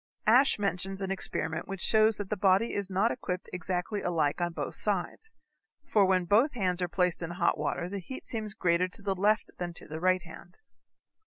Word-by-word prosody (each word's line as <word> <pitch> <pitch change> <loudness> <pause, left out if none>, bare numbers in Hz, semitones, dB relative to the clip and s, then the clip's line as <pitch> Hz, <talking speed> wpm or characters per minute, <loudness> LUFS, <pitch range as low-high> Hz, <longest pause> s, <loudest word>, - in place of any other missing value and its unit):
Ashe 250 +6 +5
mentions 195 -1 -2
an 190 - -2
experiment 160 -3 -2
which 195 -1 -5
shows 220 -1 +4
that 205 -1 -6
the - - +2
body 195 +3 +3
is 200 -1 -2
not 195 +5 +2
equipped 180 -6 -4
exactly 180 +3 -2
alike 165 -2 0
on 175 0 0
both 165 - -4
sides, 210 - -3 0.5
for 205 -3 +3
when 185 -1 +2
both 225 - +3
hands 185 -5 -1
are 180 - +1
placed 180 0 0
in 165 - -4
hot 175 0 +1
water 175 - -2
the 200 +2 -4
heat 260 +9 -8
seems 215 -2 -2
greater 180 -2 +2
to 185 - -10
the 195 -1 0
left 205 +3 +1
than 175 -1 -3
to - - -10
the 155 +1 -6
right 185 +1 +2
hand. 175 +1 -13
190 Hz, 200 wpm, -29 LUFS, 175-205 Hz, 0.5 s, Ashe